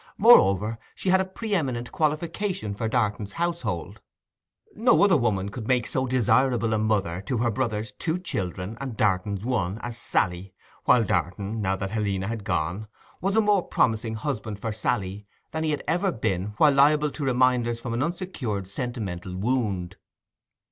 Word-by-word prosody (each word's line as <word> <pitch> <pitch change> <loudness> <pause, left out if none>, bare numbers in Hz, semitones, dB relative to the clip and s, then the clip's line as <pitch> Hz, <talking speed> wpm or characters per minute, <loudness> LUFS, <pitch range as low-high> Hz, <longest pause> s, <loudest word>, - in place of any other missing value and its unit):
Moreover, 110 - +5 0.2
she 190 - -2
had 190 +1 +5
a - - -1
pre 210 +3 -5
eminent 130 -9 -1
qualification 160 - -1
for 110 +2 -2
Darton's 105 -4 -1
household; 110 - -3 0.7
no 235 +1 +4
other 200 -4 +5
woman 105 -8 +1
could 110 +1 -7
make 125 -3 +2
so 130 0 0
desirable 120 -1 +2
a 110 - +1
mother 100 -5 0
to 125 - 0
her 120 +1 +1
brother's 110 -2 -2
two 160 +10 -2
children 100 - -4
and 130 -5 -5
Darton's 100 0 0
one 105 -6 -1
as 120 -1 -5
Sally—while 95 -3 0
Darton, 100 +5 -1
now 95 -1 +1
that 95 0 -4
Helena 100 -3 -1
had 115 -1 -4
gone, 90 +2 -2 0.3
was 195 +2 0
a 220 - +5
more 205 -2 +3
promising 110 -7 0
husband 110 -4 -3
for 110 +2 -3
Sally 100 -1 -2 0.2
than 160 0 -2
he 160 - 0
had 150 - -1
ever 185 +3 +1
been 105 - -2
when 145 0 +5
liable 150 +1 +4
to 150 - -6
reminders 125 -2 +2
from 115 0 -4
an 120 - -1
uncured 145 - -3
sentimental 95 -6 -4
wound. 100 -5 -1
115 Hz, 160 wpm, -25 LUFS, 100-140 Hz, 0.7 s, Moreover